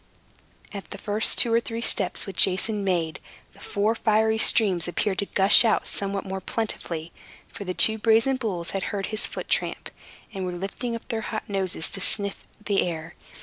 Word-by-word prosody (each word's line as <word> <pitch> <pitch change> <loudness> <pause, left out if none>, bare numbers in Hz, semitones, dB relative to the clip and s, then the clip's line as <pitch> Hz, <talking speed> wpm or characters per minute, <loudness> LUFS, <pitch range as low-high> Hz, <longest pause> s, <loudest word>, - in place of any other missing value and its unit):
At 200 -1 -9
the 200 - -9
first 210 +2 +3
two 230 - +6
or 230 - +4
three 230 0 -6
steps 195 -5 +1
which 195 -2 +4
Jason 200 +2 -2
made, 170 -4 -2 0.3
the - - -20
four 210 +2 -1
fiery 220 0 +1
streams 195 -8 +4
appeared 190 +2 -2
to 200 - -1
gush 195 +4 +6
out 225 - +1
somewhat 200 0 0
more 190 0 -5
plentifully; 170 -6 -5 0.4
for 205 -3 -10
the 185 -1 -5
two 220 0 +5
brazen 230 +4 +2
bulls 185 -9 -3
had 195 -1 -4
heard 200 -1 -4
his 215 - -1
foot - - -8
tramp, - - -2 0.4
and 190 -2 -5
were 180 -1 -4
lifting 200 +7 -5
up 230 - -10
their 225 -3 -3
hot 215 0 -6
noses 190 -5 -2
to 195 - -3
snuff 200 0 -2 0.2
the 200 -2 +1
air. 165 -1 -5
200 Hz, 190 wpm, -24 LUFS, 185-220 Hz, 0.4 s, two